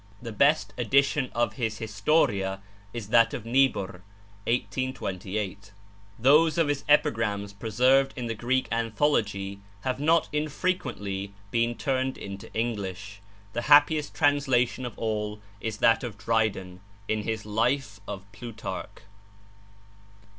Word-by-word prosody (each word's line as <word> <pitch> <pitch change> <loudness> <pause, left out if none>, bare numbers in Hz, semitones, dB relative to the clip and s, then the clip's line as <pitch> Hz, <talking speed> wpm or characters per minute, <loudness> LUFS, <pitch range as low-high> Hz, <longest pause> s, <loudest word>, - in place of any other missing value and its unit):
The 115 -2 -7
best 140 +8 +2
edition 135 +2 +2
of 120 0 +1
his 110 -4 -2
'Historia' 105 -3 +1 0.3
is 115 -3 -6
that 115 +1 +4
of 115 - -7
Niebuhr 115 -7 +1 0.5
(1828). 100 -5 -3 0.5
Those 150 +6 +5
of 165 -3 +2
his 145 -1 -1
epigrams 105 -8 +2
preserved 125 +6 +3
in 125 - -4
the 115 - -2
Greek 125 +4 0
anthology 110 -5 0 0.2
have 130 +2 -2
not 160 +3 +3
infrequently 130 - -2 0.2
been 115 0 +1
turned 130 0 -1
into 100 0 -8
English; 100 -3 -3 0.3
the 120 - -1
happiest 150 +1 +5
translation 130 -4 +2
of 120 - -10
all 105 -1 -2 0.2
is 110 -1 -4
that 115 +3 +4
of 115 -5 -5
Dryden, 100 -4 -1 0.3
in 110 0 0
his 110 0 -3
'Life 110 0 0
of 100 -1 -6
Plutarch.' 115 +1 -7
115 Hz, 120 wpm, -27 LUFS, 100-135 Hz, 0.5 s, Those